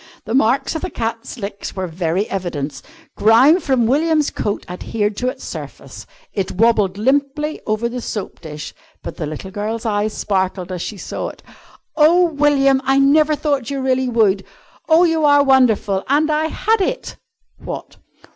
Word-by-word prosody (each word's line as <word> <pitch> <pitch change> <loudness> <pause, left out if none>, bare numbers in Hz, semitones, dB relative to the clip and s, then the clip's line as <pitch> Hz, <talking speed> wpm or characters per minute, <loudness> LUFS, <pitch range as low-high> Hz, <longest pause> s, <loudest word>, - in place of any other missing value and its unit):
The 220 - -4
marks 255 0 +2
of 320 - -4
the 370 - -3
cat's 230 -1 -4
licks 200 -2 -6
were 190 -1 -2
very 175 +3 -1
evident; 165 -7 -4 0.3
grime 250 - +5
from 260 -7 +1
William's 305 +4 +2
coat 205 -1 -3
adhered 205 +3 -2
to 250 - -1
its 255 - -4
surface; - - -9 0.3
it 195 -2 -2
wobbled 210 -2 +2
limply 285 +6 0
over 215 +2 0
the 245 +1 -5
soap 210 -4 -5
dish, 150 -2 -8 0.3
but - - -7
the 155 - -3
little 155 +6 -7
girl's 215 +3 -4
eyes 210 -1 0
sparkled 190 -2 -1
as 180 -2 -4
she 210 - -5
saw - - -5
it. - - -11 0.5
"Oh, 340 +3 +4
William, 280 -2 +3
I 270 +1 +2
never 300 +3 +4
thought 285 -5 -1
you 280 -1 -3
really 260 -1 0
would! 210 -5 +2 0.5
Oh, 325 +2 +6
you 325 -2 +2
are 285 -1 +5
wonderful! 235 -8 +3
And 300 +3 +2
I 305 +1 +1
had 445 +5 0
it!" - - -3 0.4
"What?" - - -7
235 Hz, 165 wpm, -19 LUFS, 200-285 Hz, 0.5 s, Oh